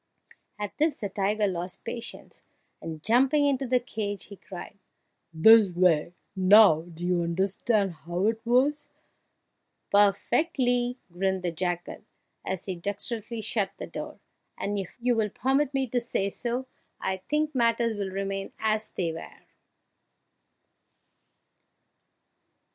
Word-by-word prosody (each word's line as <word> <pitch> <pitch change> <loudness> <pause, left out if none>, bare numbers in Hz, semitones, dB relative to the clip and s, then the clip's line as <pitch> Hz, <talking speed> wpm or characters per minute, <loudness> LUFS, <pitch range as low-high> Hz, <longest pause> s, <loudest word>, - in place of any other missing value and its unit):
At 205 -1 -5
this 310 0 +2
the 205 - -4
tiger 205 +2 0
lost 180 -1 -4
patience, 235 -1 -7 0.4
and, 160 -1 -7
jumping 270 +6 +4
into 275 -2 +1
the 250 0 +3
cage, 205 -4 -5
cried, 195 +1 -9 0.5
"This 210 +6 +7
way! 175 -2 +2 0.2
Now 190 -3 +7
do 170 0 -8
you 180 -1 +1
understand 195 +4 0
how 175 +5 -3
it 225 +1 0
was?" 260 +5 +2 1.0
"Perfectly!" 245 - +2 0.2
grinned 190 +1 -1
the 175 - 0
jackal, 175 +1 -3 0.4
as 190 -1 -3
he 190 - -3
dexterously 220 +5 -4
shut 205 -3 -1
the - - -5
door, - - -7 0.4
"and 205 0 -2
if 190 - -4
you 245 0 +2
will 220 -2 +1
permit 270 +6 +1
me 270 -1 0
to 245 - +1
say 200 -4 -1
so, 245 +4 -3 0.3
I 190 0 -2
think 300 +10 -1
matters 230 -2 +2
will 200 -2 -3
remain 195 0 -4
as 215 0 0
they 170 -3 -2
were!" 165 - -9
205 Hz, 125 wpm, -27 LUFS, 185-240 Hz, 1.0 s, This